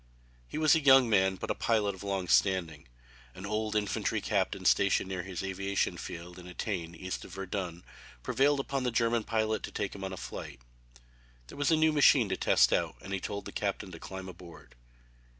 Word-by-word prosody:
He - - -6
was 155 -1 +5
a 160 - +4
young 135 -2 +7
man 95 -2 +3
but - - -4
a - - +2
pilot 105 -3 +1
of 95 - -12
long 100 -2 -2
standing. 85 -8 +1 0.5
An 95 - -8
old 110 +1 -2
infantry 105 -1 0
captain - - -1
stationed 100 -1 +3
near 95 -2 -3
his 95 0 -6
aviation 95 +1 -1
field 85 +1 -8
at 90 - -11
Etain, 90 -2 -4
east 95 +2 -5
of 95 - -11
Verdun, 90 -3 -4 0.4
prevailed 140 +1 +2
upon 135 0 -2
this 125 -2 -1
German 115 -1 +2
pilot 110 -1 0
to - - -6
take 100 - -3
him 95 - -8
on 95 - -4
a 95 - -6
flight. - - -8 0.9
There - - -11
was 145 - +2
a 165 - +5
new 155 0 +3
machine 140 -6 +5
to 95 - 0
test - - +4
out - - 0
and 95 - -7
he 95 - -1
told 100 +2 -5
the - - -7
captain 100 -2 -3
to 80 - -9
climb 95 +2 -7
aboard. 85 -8 -12
95 Hz, 205 wpm, -30 LUFS, 90-110 Hz, 0.9 s, young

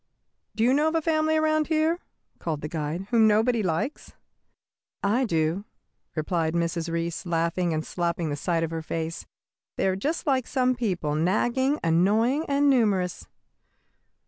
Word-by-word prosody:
"Do 220 - +1
you 250 +2 +4
know 295 +3 +3
of 315 - 0
a 325 - +2
family 315 -1 +2
around 310 -1 +2
here," 320 +2 +1 0.4
called 155 -3 -3
the 150 - -3
guide, 160 +3 -3
"whom 225 -2 +5
nobody 220 +2 +3
likes?" 180 - -3 0.9
"I 230 +6 +2
do," 165 0 0 0.5
replied 160 0 -1
Mrs. 170 0 -1
Reece, 165 0 -2
laughing 170 0 0
and 155 0 -2
slapping 170 -2 -2
the - - -1
side 165 +2 -1
of 165 - -2
her 165 0 -3
face. 165 +1 -4 0.5
"They - - 0
are 190 - +1
just 295 - -2
like 265 -4 +1
some 255 -2 +2
people, 185 -11 -2
nagging, 240 - +1
annoying, 215 - +2
and 285 0 +2
numerous." 205 -9 +1
190 Hz, 155 wpm, -26 LUFS, 165-260 Hz, 0.9 s, whom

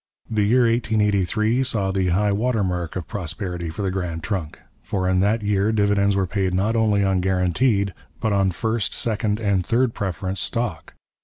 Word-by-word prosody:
The 110 -2 0
year 125 +3 +4
1883 110 0 +1
saw 100 -7 0
the 95 -1 0
high 100 +4 +2
water 110 +1 +1
mark 90 -3 -2
of 90 -3 -4
prosperity 90 -2 -4
for 85 +6 -5
the 95 - 0
Grand 90 -4 -3
Trunk; 90 -5 -3 0.2
for 95 -2 -2
in 90 0 +2
that 105 +3 +1
year 100 +1 +1
dividends 100 -2 +2
were 95 -1 +1
paid 95 -1 -1
not 105 +5 +1
only 105 -3 +2
on 95 -1 +2
guaranteed 95 +3 +1 0.3
but 110 -2 0
on 95 -1 +3
first, 110 +6 -2
second, 110 -2 -1
and 100 -4 +1
third 120 +4 +1
preference 95 -1 -3
stock. 115 -4 -3
100 Hz, 175 wpm, -22 LUFS, 95-110 Hz, 0.3 s, year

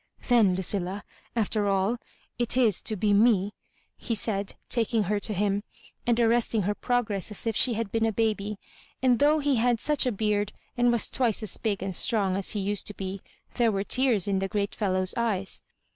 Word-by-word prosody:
" - - -15
Then, 220 -7 +4
Lucilla^ 190 +1 -1 0.3
after 215 -2 0
all, 195 +4 +1 0.4
it 240 +1 +1
is 225 -7 +3
to 215 - -2
be 205 +1 +1
me," 205 -2 +3 0.4
he 230 - -3
said, 200 -1 -1
taking 230 -2 +1
her 205 +2 -1
to 215 - -1
him, 200 0 0 0.5
and 240 -1 +2
arresting 230 -2 +2
her 205 +3 0
pro 245 +3 0
gress 205 -3 -3
as 210 - -3
if 225 -2 -1
she 240 0 +3
had 220 -2 -3
been 225 0 +1
a - - 0
baby; 210 -2 -1 0.5
and 250 -2 +4
though 295 +2 +4
he 285 -3 +1
had 235 0 +2
such 295 -1 +1
a - - +2
beard, 210 -1 -1 0.2
and 240 -1 +3
was 235 -2 +2
twice 235 -4 +1
as 215 - 0
big 205 -4 -2
and 190 -2 -3
strong 200 -5 +1
as 195 -1 +1
he 210 - -2
used 200 +1 -2
to 210 - -3
be, 190 0 -5 0.4
there 235 -3 +3
were 195 -1 -1
tears 240 -4 +2
in 195 -1 +1
the 195 - -1
great 200 0 -2
fellow's 185 -3 0
eyes. 205 -5 -1
210 Hz, 205 wpm, -27 LUFS, 200-235 Hz, 0.5 s, Then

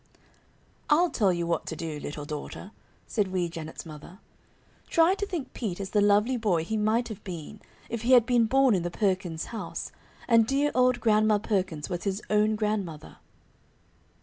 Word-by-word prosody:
"I'll 335 +4 +4
tell 200 -5 +2
you 170 -1 -1
what 170 0 -1
to 160 - -4
do, 160 -2 -5
little 145 0 -6
daughter," 150 +6 -7 0.3
said 210 -4 0
Wee 185 -2 -1
Janet's 165 -1 -8
mother. 155 +3 -11 0.7
"Try 335 +2 +4
to 405 +1 -3
think 320 -10 -5
Pete 200 -7 -4
is 195 -1 -5
the 210 - +3
lovely 210 +5 +3
boy 195 -8 +1
he 220 +7 -3
might 220 +3 +1
have 220 - -8
been 180 +2 -7 0.3
if 230 -1 -4
he 245 +3 +3
had 245 -3 +7
been 240 -2 +3
born 270 0 +4
in 185 - +1
the 175 - -2
Perkins' 185 -4 -1
house, 205 -7 -5 0.4
and 230 -2 +5
dear 280 +3 +1
old 250 -1 +3
Grandma 215 -1 +4
Perkins 185 -8 -2
was 180 0 -4
his 195 0 -1
own 215 +1 +3
grandmother." 205 -8 -3
210 Hz, 175 wpm, -27 LUFS, 175-235 Hz, 0.7 s, had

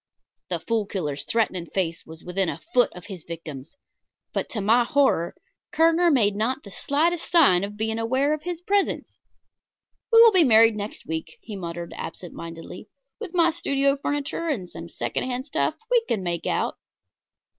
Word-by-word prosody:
The - - -1
Fool 225 -3 -1
Killer's 150 -8 -3
threatening 190 -7 0
face 170 -3 -3
was 160 +1 -11
within 180 0 -1
a - - -4 0.2
foot 245 - +4
of 180 - -11
his 190 -6 -8
victim's; 160 - -9 0.6
but - - -2
to 220 - -4
my 225 +5 +4
horror, 265 - +2 0.4
Kerner 330 +2 +4
made 215 -9 +3
not 225 +5 -1
the 200 - -11
slightest 325 - 0
sign 280 - +5
of 205 +1 -5
being 220 +1 -1
aware 260 +6 +1
of 305 - -3
his 350 0 -5
presence. 400 +2 -1 0.9
"We 455 - +7
will 460 0 +9
be 370 -4 +6
married 225 -4 +6
next 210 +1 -6
week," 160 0 -5
he 215 - -8
muttered 170 -2 -6
absent 175 +1 -7
mindedly. 165 +1 -9 0.3
"With 360 - -7
my 340 -1 +4
studio 275 -4 +1
furniture 290 +3 -3
and 225 - -2
some 165 0 -9
second - - -3
hand 255 0 -3
stuff 290 - 0 0.2
we 480 -2 +4
can 200 -4 -1
make 170 -2 -3
out." - - -1
225 Hz, 175 wpm, -24 LUFS, 175-290 Hz, 0.9 s, will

